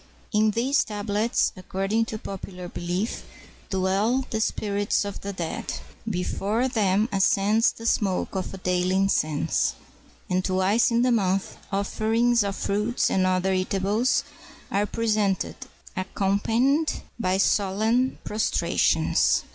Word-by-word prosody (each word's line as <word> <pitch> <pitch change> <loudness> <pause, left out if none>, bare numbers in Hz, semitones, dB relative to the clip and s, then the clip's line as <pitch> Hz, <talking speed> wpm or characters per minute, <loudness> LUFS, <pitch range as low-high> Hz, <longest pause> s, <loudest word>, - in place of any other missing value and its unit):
In 215 +1 +4
these 250 +6 +2
tablets, 210 +2 0
according 195 +4 -1
to 220 - -5
popular 185 -3 -7
belief, 175 +5 -3 0.5
dwell 200 +7 +1
the 220 - -1
spirits 205 -1 0
of 200 - -6
the 200 - -4
dead. 175 -4 -4 0.4
Before 210 +5 -1
them 210 -4 +2
ascends 200 +3 +3
the 230 - -11
smoke 195 -5 0
of 190 0 -5
daily 180 0 +1
incense; 155 -6 +1 0.5
and, 185 0 0
twice 190 +5 +2
in 235 0 +2
the 250 - +3
month, 195 -4 0 0.2
offerings 220 +4 +1
of 200 -1 -2
fruits 210 +5 0
and 185 -1 +2
other 185 +1 +1
eatables 195 +5 +1 0.5
are 205 +1 +1
presented, 210 -4 0 0.4
accompanied 225 +10 +1 0.3
by 185 -4 +1
solemn 215 +6 +2
prostrations. 215 +1 +2
200 Hz, 115 wpm, -25 LUFS, 190-225 Hz, 0.5 s, In